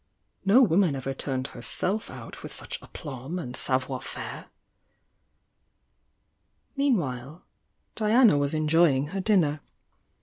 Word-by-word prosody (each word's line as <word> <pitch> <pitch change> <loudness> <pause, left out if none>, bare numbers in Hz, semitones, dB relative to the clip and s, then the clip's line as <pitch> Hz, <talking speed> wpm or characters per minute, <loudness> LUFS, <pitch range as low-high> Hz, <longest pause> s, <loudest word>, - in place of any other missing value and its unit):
"No 220 +7 +6
woman 185 - +3
ever 135 0 -3
turned 130 -1 -3
Herself 190 - -3
out - - -9
with - - -8
such - - -3
aplomb 140 +2 -7
and 130 -8 -5
savoir 130 0 0
faire'" - - -7 2.3
Meanwhile 160 - -1 0.5
Diana 225 - +5
was 145 +2 0
enjoying 155 -3 +3
her 195 +3 -3
dinner. 170 -8 +2
155 Hz, 105 wpm, -27 LUFS, 135-195 Hz, 2.3 s, No